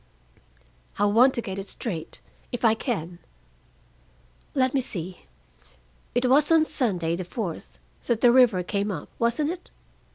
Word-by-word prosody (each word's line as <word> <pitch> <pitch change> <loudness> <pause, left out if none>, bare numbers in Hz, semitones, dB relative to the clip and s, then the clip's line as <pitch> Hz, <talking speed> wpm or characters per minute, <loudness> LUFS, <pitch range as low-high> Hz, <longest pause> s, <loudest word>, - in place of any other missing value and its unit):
"I 205 - +2
want 235 +6 +5
to 235 - -1
get 190 0 -5
it 195 - -6
straight, 170 -10 -5 0.3
if 245 -1 -2
I 220 - +6
can. 180 - -4 1.4
Let 260 -2 +2
me 275 - +2
see. 180 - -6 0.9
It 245 - +2
was 290 +5 +4
on 320 -1 +5
Sunday, 180 - 0
the 185 - -4
fourth, 180 -1 -6 0.3
that 235 -2 +1
the 240 - +6
river 240 -8 +5
came 200 +3 -2
up, 165 -7 -5
wasn't 240 +7 +1
it? 360 0 -8
225 Hz, 150 wpm, -25 LUFS, 185-255 Hz, 1.4 s, I